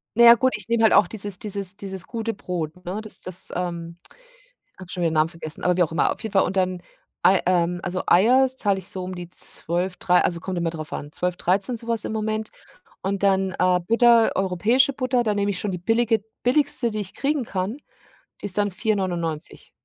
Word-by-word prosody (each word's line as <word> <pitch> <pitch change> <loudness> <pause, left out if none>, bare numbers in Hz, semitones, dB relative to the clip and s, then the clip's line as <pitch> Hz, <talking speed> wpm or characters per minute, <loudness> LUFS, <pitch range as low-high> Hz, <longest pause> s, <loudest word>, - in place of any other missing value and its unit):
Na 235 - +5
ja, 235 - +11
gut, 260 +2 +1
ich - - -6
nehme 230 -1 +2
halt 220 - +5
auch 205 - +6
dieses 205 -3 -5
dieses 200 -2 -1
dieses 190 -2 -6
gute 225 -1 -3
Brot, 180 -3 -5
ne? 185 +4 -3
Das 215 -1 -6
das 185 0 -5
ähm, 170 -1 -4 0.8
habe 185 -2 -10
schon 180 - -3
wieder 165 - +2
'n - - -3
Namen 155 +1 +3
vergessen, 165 -2 -7
aber 180 -1 +2
wie 180 - +4
auch 165 - -1
immer. 165 - +2
Auf - - -10
jeden 220 -3 -5
Fall 195 - +4
und 195 - -3
dann 185 -1 0 0.4
Ei 185 +1 +5
ähm, 175 -1 +1
also 185 0 -3
Eier 250 +9 +5
zahle 205 -7 0
ich 185 - -9
so 185 - -5
um 185 0 -5
die 175 -1 -7
12, 180 +1 -3
3, 180 0 +3
also 170 -1 -1
kommt 185 +2 -4
immer 170 -1 0
drauf 155 -2 -8
an, 145 +1 -6
12, 180 +1 -2
13, 195 +8 0
so 230 - -4
was 230 -2 0
im - - -4
Moment. 215 0 -2 0.5
Und 195 +1 -2
dann, 195 -1 +2
äh, 180 0 +3
Butter, 230 0 +5
europäische 210 +9 +2
Butter, 255 -2 +1
da 215 -3 0
nehme 205 0 0
ich 190 - -2
schon 205 - -2
die - - -2
billige 225 +2 +1 0.2
billigste, 250 -2 +2
die 215 -1 -3
ich 195 -2 -5
kriegen 285 -1 0
kann, 195 +2 -3 0.7
die - - -6
ist 195 -1 -1
dann 205 0 +2
4,99. 180 -6 -2
190 Hz, 225 wpm, -23 LUFS, 180-220 Hz, 0.8 s, ja